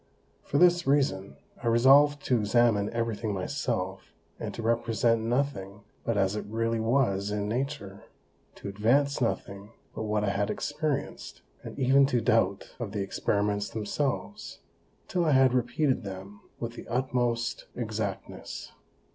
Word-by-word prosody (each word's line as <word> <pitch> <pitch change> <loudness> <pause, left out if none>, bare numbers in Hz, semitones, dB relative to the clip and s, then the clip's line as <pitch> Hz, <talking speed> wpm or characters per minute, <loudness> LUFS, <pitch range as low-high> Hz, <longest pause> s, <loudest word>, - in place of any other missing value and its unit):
For 140 - -2
this 175 0 +4
reason, 100 - +1 0.3
I - - -3
resolved 140 +5 +5
to 125 -2 +2
examine 105 -1 +3
every 115 -1 -1
thing 105 -1 -3
myself, 95 -3 -3 0.2
and - - -4
to 115 - -5
represent 115 0 +1
nothing 110 -5 -2 0.2
but 115 -2 -1
as 95 0 +1
it 105 - -3
really 115 +1 -1
was 110 -4 +1
in 105 0 -2
Nature, 120 -4 -4 0.5
to - - -8
advance 120 +9 +2
nothing 100 -2 -3 0.2
but - - -5
what 105 0 0
I 100 - +1
had 100 +1 -1
experienced, 150 -1 -3 0.2
and - - -9
even 135 +1 +5
to 125 -3 +1
doubt 115 -4 +1
of 110 -5 -5
the 100 -2 -1
Experiments 100 +1 -1
themselves, 140 - -3 0.5
till 180 -2 0
I 155 -3 +3
had 130 -1 +5
repeated 130 +3 +1
them 100 +1 -8 0.2
with 115 0 -4
the - - -10
utmost 120 -1 -1
Exactness. 110 -4 -5
115 Hz, 145 wpm, -28 LUFS, 105-135 Hz, 0.5 s, resolved